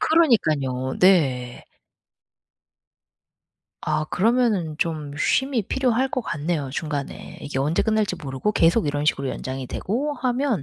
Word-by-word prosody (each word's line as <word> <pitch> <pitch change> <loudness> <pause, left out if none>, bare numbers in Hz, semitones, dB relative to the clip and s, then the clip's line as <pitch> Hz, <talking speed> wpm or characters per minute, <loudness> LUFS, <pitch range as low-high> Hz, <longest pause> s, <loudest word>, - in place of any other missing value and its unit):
그러니깐요. 150 - +2
네. 135 -10 +3 2.2
아. 155 0 -1
그러면은 210 -7 +1
좀 155 -4 -2
쉼이 265 - +1
필요할 255 +3 +1
것 255 - -1
같네요 150 -6 -2
중간에. 145 -1 -5
이게 145 -2 -4
언제 150 +5 +1
끝날지 215 -4 0
모르고 140 +9 -2
계속 170 +1 +3
이런 145 0 -1
식으로 140 -3 +1
연장이 130 0 -5
되고 270 - -2
하면 250 - 0
165 Hz, 270 characters per minute, -23 LUFS, 140-235 Hz, 2.2 s, 네